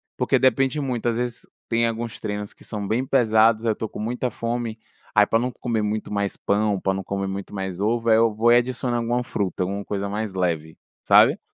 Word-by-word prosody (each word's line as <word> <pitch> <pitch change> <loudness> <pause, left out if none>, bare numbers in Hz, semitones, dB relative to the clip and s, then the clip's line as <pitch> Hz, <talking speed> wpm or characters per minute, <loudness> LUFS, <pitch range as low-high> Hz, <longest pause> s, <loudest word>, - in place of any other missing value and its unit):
porque - - +2
depende 135 +3 +2
muito 125 -5 -2
às 115 - -1
vezes 120 -1 -3 0.3
tem 115 0 +2
alguns 115 0 -4
treinos 105 -1 -4
que - - -19
são 105 -2 -5
bem 120 +4 0
pesados 115 -3 +4
aí - - +2
eu - - +3
estou 110 +1 -4
com - - -9
muita 125 +3 -2
fome, 115 0 -3 0.4
aí 105 -1 +7
pra 115 - +2
não 125 +2 -1
comer 115 -3 -2
muito 105 +1 -2
mais 100 -1 -1
pão, 100 -1 0
pra 95 +1 0
não 95 - -4
comer 100 +1 -3
muito 100 +1 -6
mais 95 -2 -4
ovo, 115 +3 0
aí 110 - +6
eu 115 -1 +3
vou 115 +3 +3
e 120 - +7
adiciono 125 0 -1
alguma 120 +1 0
fruta, 100 -7 -2
alguma 100 +2 -3
coisa 100 -1 -3
mais 105 0 -3
leve, 85 -4 -2 0.3
sabe? - - +6
110 Hz, 225 wpm, -23 LUFS, 100-120 Hz, 0.4 s, aí